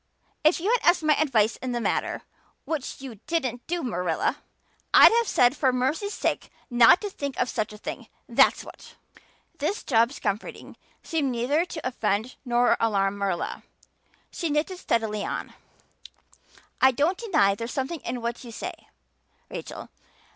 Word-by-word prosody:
If 310 +3 +4
you 390 +7 0
had - - +2
asked 345 -2 +2
my 305 0 +4
advice 235 -8 +2
in 255 -1 -4
the 240 - -1
matter - - -1 0.4
which 295 -4 -4
you 250 -7 -9
didn't 260 -7 -2
do, 345 0 -2
Marilla 180 -9 -1 0.6
I'd - - +10
have 465 0 +2
said 245 -4 +3
for 265 -3 +2
mercy's 280 +12 -1
sake - - -2 0.2
not 240 +6 +6
to 415 - -3
think 280 -6 -5
of 250 - +1
such 215 -4 -2
a 210 - -10
thing, - - -7 0.2
that's - - +4
what." - - -13 0.6
This 410 - -2
Job's 235 +2 +2
comforting 200 +2 -4 0.3
seemed 300 -5 -1
neither 260 +8 +1
to 315 -7 -5
offend 225 -1 -1
nor 245 -1 +2
to - - -4
alarm 200 -1 0
Marilla. 195 -4 -2 0.7
She 335 - -3
knitted 305 +5 -1
steadily 220 - -1
on. - - -4 1.3
"I 265 - +8
don't 290 +8 +1
deny 310 - +3
there's 230 +4 -5
something 275 +5 -3
in 245 -1 -5
what 235 +2 -3
you 240 - -9
say, - - -5 0.8
Rachel. - - -7
255 Hz, 160 wpm, -26 LUFS, 230-315 Hz, 1.3 s, I'd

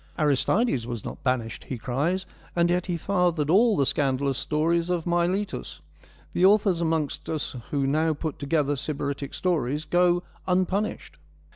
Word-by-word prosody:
' - - -29
Aristides 150 - +2
was 120 -4 -5
not - - -7
banished,' 120 -6 -1
he 130 - -4
cries, 150 +11 -1
* - - -26
and 170 0 +3
yet 180 +1 0
he 175 -2 -1
fathered 175 -4 +1
all 220 +3 +5
the 140 - +3
scandalous 135 -1 0
stories 165 +3 0
of 175 -2 -1
Miletus: 175 +3 -1 0.5
the 180 - +1
authors 195 -3 +4
amongst 160 -3 -1
us 155 -4 -3
who 140 -2 0
now 155 +3 +1
put 155 0 -4
together 145 0 +1
Sybaritic 140 -1 -4
stories 150 -4 0
go 175 0 +3 0.2
unpunished.' 185 +3 -1
160 Hz, 155 wpm, -26 LUFS, 140-180 Hz, 0.5 s, all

